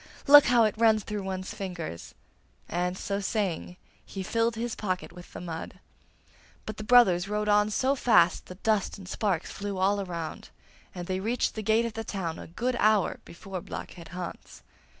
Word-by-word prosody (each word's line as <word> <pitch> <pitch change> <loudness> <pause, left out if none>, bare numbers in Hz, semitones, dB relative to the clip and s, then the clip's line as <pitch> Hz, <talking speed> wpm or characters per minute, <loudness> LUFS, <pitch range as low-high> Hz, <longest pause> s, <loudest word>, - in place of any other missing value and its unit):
Look 290 0 +9
how 240 -1 +5
it 215 - +2
runs 220 -2 +4
through 210 +1 -4
one's 190 +1 -4
fingers!' 180 - -6 0.5
and, 180 +2 -1
so 200 0 -2
saying, 195 -3 -2 0.3
he 195 - -6
filled 230 +3 0
his 230 +1 -3
pocket 185 -4 -3
with 180 0 -12
the - - -8
mud. 165 -2 -7 0.9
But 215 -1 -6
the 215 - -5
brothers 205 -6 +5
rode 210 0 -1
on 210 0 +4
so 260 +5 +1
fast 185 -10 +3
that 180 +1 -12
dust 215 -3 +1
and 190 -2 -11
sparks 190 -4 -1
flew 200 -1 -5
all 200 +2 +2
around, 170 -4 -6 0.5
and 175 -1 -5
they 185 +1 -2
reached 225 +5 0
the 220 - -4
gate 220 +2 +2
of 230 - -4
the 225 - -4
town 175 -7 -4
a - - -9
good 240 +9 -2
hour 215 -2 +3
before 185 +1 -7
Blockhead 170 0 -8
Hans. 180 0 -8
200 Hz, 180 wpm, -28 LUFS, 180-220 Hz, 0.9 s, Look